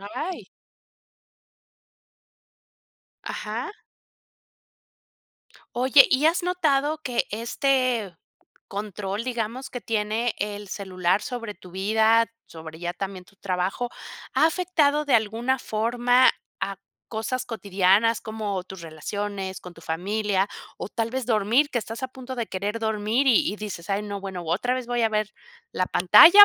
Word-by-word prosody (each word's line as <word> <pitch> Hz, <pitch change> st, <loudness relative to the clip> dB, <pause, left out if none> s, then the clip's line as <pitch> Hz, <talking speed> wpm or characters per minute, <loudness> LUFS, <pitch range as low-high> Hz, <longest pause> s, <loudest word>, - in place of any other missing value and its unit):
Ay. 310 Hz, -, -5 dB, 2.8 s
Ajá. 435 Hz, -, -4 dB, 2.0 s
Oye, 260 Hz, +3 st, +7 dB
¿y 275 Hz, +4 st, +4 dB
has 335 Hz, +2 st, +3 dB
notado 310 Hz, -4 st, +1 dB
que 250 Hz, -6 st, -1 dB
este, 235 Hz, -2 st, 0 dB, 0.5 s
control, 200 Hz, +1 st, -4 dB
digamos 250 Hz, +2 st, -3 dB
que 245 Hz, -, -5 dB
tiene 220 Hz, +1 st, 0 dB
el 205 Hz, -1 st, -4 dB
celular 185 Hz, -1 st, 0 dB
sobre 230 Hz, -4 st, -5 dB
tu 180 Hz, -, -14 dB
vida, 220 Hz, +4 st, +3 dB, 0.2 s
sobre 160 Hz, -1 st, -10 dB
ya 175 Hz, 0 st, -3 dB
también 190 Hz, 0 st, -5 dB
tu 195 Hz, -, -23 dB
trabajo, 190 Hz, +5 st, -1 dB, 0.5 s
ha -, -, +5 dB
afectado 315 Hz, -4 st, +2 dB
de 275 Hz, -, +3 dB
alguna 230 Hz, +4 st, +2 dB
forma 245 Hz, +3 st, +3 dB, 0.3 s
a 195 Hz, -1 st, -2 dB, 0.3 s
cosas 240 Hz, +3 st, -3 dB
cotidianas 200 Hz, +1 st, +2 dB
como, 210 Hz, -4 st, -3 dB
tus 190 Hz, -2 st, -10 dB
relaciones 190 Hz, +4 st, -4 dB
con 180 Hz, -, -10 dB
tu 165 Hz, -, -15 dB
familia, 195 Hz, +4 st, 0 dB, 0.3 s
o -, -, -5 dB
tal 225 Hz, 0 st, -1 dB
vez 260 Hz, +1 st, -2 dB
dormir? 230 Hz, +6 st, +3 dB
Que 245 Hz, -, 0 dB
estás 225 Hz, +2 st, -6 dB
a 260 Hz, -, -1 dB
punto 260 Hz, 0 st, -8 dB
de 235 Hz, -3 st, -2 dB
querer 200 Hz, +4 st, -3 dB
dormir 220 Hz, +4 st, +1 dB
y 235 Hz, -6 st, +5 dB
y 210 Hz, -, -5 dB
dices: 205 Hz, -5 st, -6 dB
"Ay, 200 Hz, +1 st, 0 dB
no, 200 Hz, -1 st, -5 dB
bueno, 190 Hz, -2 st, -5 dB
otra 195 Hz, +10 st, 0 dB
vez 255 Hz, -2 st, -4 dB
voy 240 Hz, 0 st, 0 dB
a 225 Hz, -, +4 dB
ver 215 Hz, -1 st, -1 dB, 0.4 s
la 185 Hz, -, 0 dB
pantalla 345 Hz, -, +9 dB
220 Hz, 135 wpm, -25 LUFS, 195-250 Hz, 2.8 s, pantalla